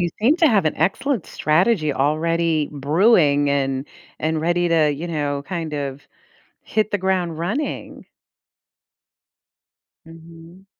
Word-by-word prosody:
you 175 - +1
seem 275 +9 +4
to 330 -3 +4
have 205 -7 +2
an 155 - 0
excellent 195 - -1
strategy 155 -1 +1
already 160 +2 0
brewing 145 - +3
and 135 -1 -1 0.3
and 155 0 -1
ready 175 +1 +1
to, 160 -3 +3
you 155 +5 -5
know, 145 -3 -2
kind 165 -4 -4
of 140 -1 -5 0.6
hit 215 0 -1
the 205 - +1
ground 180 -4 -1
running. 215 - -4 2.0
Mhm. 165 +3 -15
165 Hz, 120 wpm, -21 LUFS, 150-185 Hz, 2.0 s, seem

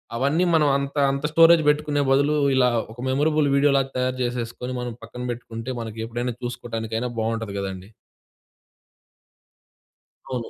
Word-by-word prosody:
అవన్నీ 145 +8 +1
మనం 150 -2 +4
అంత 140 +1 -4 0.2
అంత 140 +1 -3
స్టోరేజ్ 165 0 +7
పెట్టుకునే 150 -1 +1
బదులు 140 +2 +3 0.2
ఇలా 125 -1 +4 0.2
ఒక 120 - -14
మెమరబుల్ 150 +2 +2
వీడియోలాగా 140 -1 +3
తయారు 130 0 -1
చేసేసుకొని, 120 +1 -4
మనం 125 -1 -4
పక్కన 125 +2 -8
పెట్టుకుంటే 115 0 -6
మనకి 110 0 -6
ఎప్పుడైనా 120 +1 -3
చూసుకోవటానికైనా 115 -1 -4
బాగుంటది 110 -2 -2
కదండీ. 95 0 -6 2.4
అవును. 125 -3 -4
125 Hz, 125 wpm, -23 LUFS, 115-140 Hz, 2.4 s, స్టోరేజ్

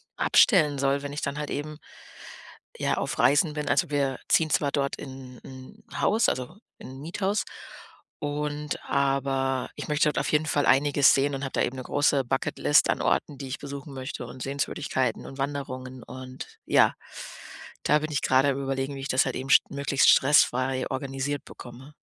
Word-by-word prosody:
abstellen 155 - +4
soll, 140 +1 +1
wenn 145 0 -6
ich 150 - -4
dann 140 0 -3
halt 150 - -4
eben 150 +1 -5 1.0
ja - - 0
auf - - -3
Reisen 150 +2 +4
bin. 150 -1 -4
Also, - - +2
wir 140 -3 -1
ziehen 160 -1 +3
zwar 145 -2 +1
dort 140 -1 -1
in 130 -2 -10
in 130 -1 -13
'n - - -6
Haus, 220 +3 +3
also, 130 +9 -4 0.2
in - - -11
'n 135 +1 -10
Miethaus 190 +6 -1 0.8
und 150 0 -3
aber 135 -1 0
ich - - -6
möchte 150 0 +2
dort - - -1
auf - - -2
jeden 150 +1 +2
Fall 145 -2 +1
einiges 140 0 +5
sehen 140 +1 +1
und 135 - -5
habe 135 - -5
da - - +1
eben 130 - -3
'ne 130 - -5
große 145 0 +2
Bucket 130 +2 -2
List 145 - +4
an - - +1
Orten, 145 - 0
die 135 - -7
ich 130 - -4
besuchen 140 0 -8
möchte 130 -1 -6
und 130 +1 -11
Sehenswürdigkeiten 130 -3 -2
und 135 - -10
Wanderungen 130 -2 -5
und 130 0 -9 0.2
ja. - - +4 0.9
Da 150 - +3
bin 155 +1 -5
ich 145 - -1
gerade 130 +2 +3
am 140 0 -1
überlegen, 135 +1 -3
wie - - -7
ich 135 - -4
das 130 - +3
halt - - -3
eben 135 +1 -5
st - - +5
möglichst 140 -1 +2
stressfrei 130 -2 +3
organisiert 135 +1 -3
bekomme. 130 +4 -12
140 Hz, 190 wpm, -26 LUFS, 130-145 Hz, 1.0 s, einiges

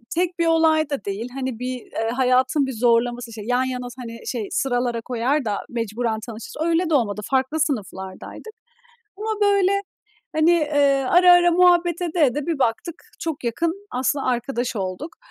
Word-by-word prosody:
tek 350 0 -1
bir 335 - +2
olay 320 -2 +3
da 280 -8 -4
değil, 205 +5 -4
hani 260 -3 -4
bir, 255 +1 -3
eee, 225 0 -4
hayatın 260 +2 +2
bir 265 - -4
zorlaması. 240 0 +1
İşte 220 -1 -8
yan 250 +2 +1
yana 250 -1 -4
s 250 +1 -11
hani, 230 -1 -9
şey, 225 -5 -3
sıralara 245 -3 0
koyar 250 +4 -1
da 205 -2 -1
mecburen 230 -1 -2
tanışırız, 230 -1 -9
öyle 335 +1 +1
de - - 0
olmadı. 210 -7 +1
Farklı 265 +3 0
sınıflardaydık. 215 - -4 0.7
Ama, 435 +1 -3
böyle, 400 -1 +3 0.6
hani, 315 +2 +4
eee 290 -5 +2
,ara 360 0 +7
ara 350 0 +6
muhabbet 350 -1 +3
ede 345 0 -2
ede 275 +3 -2
bir 330 -4 -1
baktık, 260 +7 -1 0.3
çok 320 -5 -4
yakın 335 - -2
aslında 265 +2 -1
arkadaş 245 -1 -1
olduk. 190 - -5
260 Hz, 170 wpm, -22 LUFS, 235-325 Hz, 0.7 s, ara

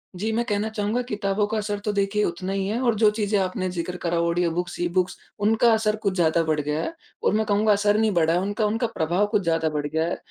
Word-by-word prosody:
जी। 215 +5 -2
मैं 230 +2 0
कहना 210 -1 -1
चाहूँगा 215 +2 -1
किताबों 205 -1 0
का 220 - -2
असर 205 -1 -2
तो 210 - +1
देखिए 200 +1 +1
उतना 185 +2 -2
ही 195 -1 -1
है 220 +4 -1
और 240 -3 +2
जो 215 0 +5
चीज़ें 210 -1 0
आपने 185 0 -1
ज़िक्र 180 0 -4
करा 170 -1 0
ऑडियो 170 0 +1
बुक्स, 175 +1 -4
ई 175 - +1
बुक्स 180 +1 0 0.2
उनका 220 +3 +3
असर 215 -1 +1
कुछ 200 -2 +1
ज़्यादा 165 -2 +2
बढ़ 155 -1 0
गया 150 - -2 0.3
और - - +2
मैं 220 +1 +1
कहूँगा 210 +1 +2
असर 205 0 +3
नहीं 220 -1 +2
बढ़ा 170 -1 +2
उनका 205 +3 -1
उनका 225 +3 0
प्रभाव 180 -1 0
कुछ 210 -3 +2
ज़्यादा 165 -1 +1
बढ़ 150 -1 -2
गया 160 +2 0
है। 175 - -1
200 Hz, 245 wpm, -24 LUFS, 170-215 Hz, 0.3 s, जो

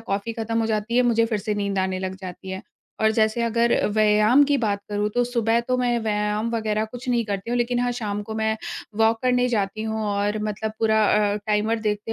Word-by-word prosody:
Coffee 205 0 -3
खत्म 225 0 -2
हो 225 - 0
जाती 220 +2 -1
है 250 - +5
मुझे 230 -2 +3
फिर 220 -2 -1
से 210 +1 -2
नींद 200 -1 -2
आने 190 0 0
लग 185 0 -4
जाती 185 0 -8
है। 190 0 -5 0.4
और 220 0 +4
जैसे 220 +1 +1
अगर 235 +1 +2 0.2
व्यायाम 215 +5 +5
की 285 0 +2
बात 205 -4 0
करूँ 205 0 -1
तो 245 0 +2
सुबह 235 -2 +1
तो 255 - +2
मैं 245 -1 +1
व्यायाम 210 +1 -1
वगैरह 215 -1 0
कुछ 245 +1 -8
नहीं 240 -2 +1
करती 200 +1 -4
हूँ 245 - +1
लेकिन 245 0 0
हाँ, 245 0 0
शाम 210 -4 -3
को 220 +1 -7
मैं 220 0 0 0.4
वॉक 225 0 +4
करने 250 0 +2
जाती 215 -2 -1
हूँ 220 0 -2
और 205 +1 0
मतलब 215 +1 -3
पूरा 220 -1 +3 0.3
अ, - - -1
टाइमर 215 +2 +1
देखते 210 +1 -2
220 Hz, 225 wpm, -23 LUFS, 210-235 Hz, 0.4 s, है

